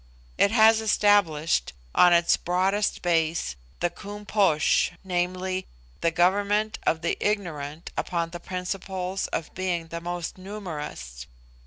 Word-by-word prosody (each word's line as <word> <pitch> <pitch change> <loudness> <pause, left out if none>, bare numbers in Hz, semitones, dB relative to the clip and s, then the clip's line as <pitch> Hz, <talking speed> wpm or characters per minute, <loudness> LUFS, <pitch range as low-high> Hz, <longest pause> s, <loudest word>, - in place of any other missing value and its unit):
It - - +4
has 220 0 +5
established, 185 - +2 0.2
on 180 - +6
its 170 0 +5
broadest 190 +4 0
base, 165 - +1 0.3
the 175 - +1
Koom 205 +1 -9
Posh 190 -8 +3
viz., 185 +1 -1 0.4
the 165 - +2
government 200 +5 +1
of 160 - +2
the 170 - +1
ignorant 165 -7 -3
upon 170 -1 -2
the 175 - -6
principle 185 +1 -4
of 165 - -3
being 175 -3 -2
the 170 0 -5
most 175 +1 -5
numerous. 150 - -7
180 Hz, 125 wpm, -26 LUFS, 165-200 Hz, 0.4 s, on